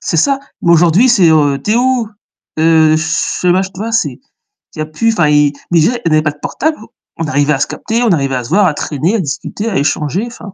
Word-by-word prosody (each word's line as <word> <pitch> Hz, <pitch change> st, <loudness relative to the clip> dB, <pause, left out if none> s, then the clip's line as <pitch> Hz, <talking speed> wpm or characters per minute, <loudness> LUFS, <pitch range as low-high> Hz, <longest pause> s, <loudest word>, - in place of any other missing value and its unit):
C'est 165 Hz, -, -2 dB
ça, 275 Hz, -, +2 dB, 0.2 s
mais 170 Hz, -, +3 dB
aujourd'hui, 175 Hz, +8 st, +4 dB
c'est, 200 Hz, -8 st, +4 dB
heu, 145 Hz, -3 st, +2 dB
«Tu 210 Hz, -, 0 dB
es -, -, +2 dB
où?» 250 Hz, -2 st, +1 dB, 0.5 s
heu, 160 Hz, -1 st, +4 dB
je 160 Hz, +3 st, -1 dB
mach 190 Hz, +2 st, +1 dB
tu 185 Hz, -, -13 dB
vois, 225 Hz, +2 st, -4 dB
c'est 225 Hz, -, -1 dB, 0.6 s
il -, -, -10 dB
y -, -, -1 dB
a -, -, -2 dB
plus, 190 Hz, +9 st, -1 dB
enfin, 175 Hz, -8 st, +2 dB
il 150 Hz, -1 st, +3 dB, 0.2 s
mais 170 Hz, -2 st, +4 dB
déjà, 170 Hz, +10 st, +2 dB
on -, -, +2 dB
n'avait 155 Hz, -1 st, +3 dB
pas 155 Hz, -1 st, -1 dB
de 145 Hz, -, -19 dB
portable, 315 Hz, +1 st, -2 dB, 0.4 s
on 165 Hz, -, -3 dB
arrivait 145 Hz, -1 st, +1 dB
à 135 Hz, -, -2 dB
se -, -, 0 dB
capter, 230 Hz, +2 st, -3 dB
on 230 Hz, -, +2 dB
arrivait 135 Hz, -5 st, 0 dB
à 125 Hz, -, -3 dB
se -, -, -9 dB
voir, 195 Hz, +4 st, +3 dB
à 155 Hz, -, 0 dB
traîner, 155 Hz, +7 st, -2 dB
à -, -, 0 dB
discuter, 195 Hz, +7 st, -4 dB
à 195 Hz, -, -2 dB
échanger, 150 Hz, +6 st, -1 dB
enfin, 220 Hz, -4 st, -11 dB
165 Hz, 255 wpm, -14 LUFS, 150-215 Hz, 0.6 s, aujourd'hui